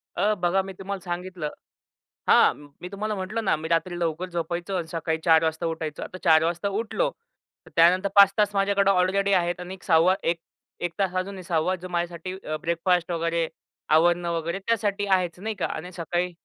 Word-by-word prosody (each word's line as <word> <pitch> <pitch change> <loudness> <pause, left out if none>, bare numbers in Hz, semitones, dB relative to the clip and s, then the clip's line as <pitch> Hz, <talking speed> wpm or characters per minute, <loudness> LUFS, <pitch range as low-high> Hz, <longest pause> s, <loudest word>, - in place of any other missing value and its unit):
अ, 210 +1 +2
बघा 180 +2 +2
मी 195 0 -8
तुम्हाला 195 +1 -5
सांगितलं. 175 -3 -4 0.8
हां, - - +6 0.3
मी 180 - -6
तुम्हाला 210 +2 -3
म्हटलं 200 +4 -3
ना - - +3
मी 155 +1 -6
रात्री 170 +1 0
लवकर 170 +2 -2
झोपायचो. 170 +2 -3
आणि 170 -2 -3
सकाळी 160 -1 -2
4:00 160 -1 +6
वाजता 160 +1 -1
उठायचो. 160 -2 -4
आता 185 - -8
4:00 160 -1 +5
वाजता 170 +3 -1
उठलो, 235 - 0 0.6
तर - - -17
त्यानंतर 180 +4 +5
5:00 200 -1 +8
तास 205 -1 +2
माझ्याकडं 200 0 +3
ऑलरेडी 195 +2 +2
आहेत. 175 -1 +1
आणि 180 +1 -6
एक 190 - -12
6वा 170 +2 +4
एक 170 0 0 0.4
1 175 - -1
तास 190 -2 +1
अजूनही 190 0 -6
6वा 175 +1 0
जो 185 0 -9
माझ्यासाठी 175 +1 -3 0.3
ब्रेकफास्ट 175 +1 +1
वगैरे, 165 0 0 0.5
आवरणं 175 +1 +3
वगैरे, 170 +3 -2
त्यासाठी 205 -3 0
आहेचं 185 -1 0
नाही 220 0 -2
का. - - -2
आणि 175 +4 -5
सकाळी 175 +1 -2
180 Hz, 180 wpm, -25 LUFS, 170-195 Hz, 0.8 s, 5:00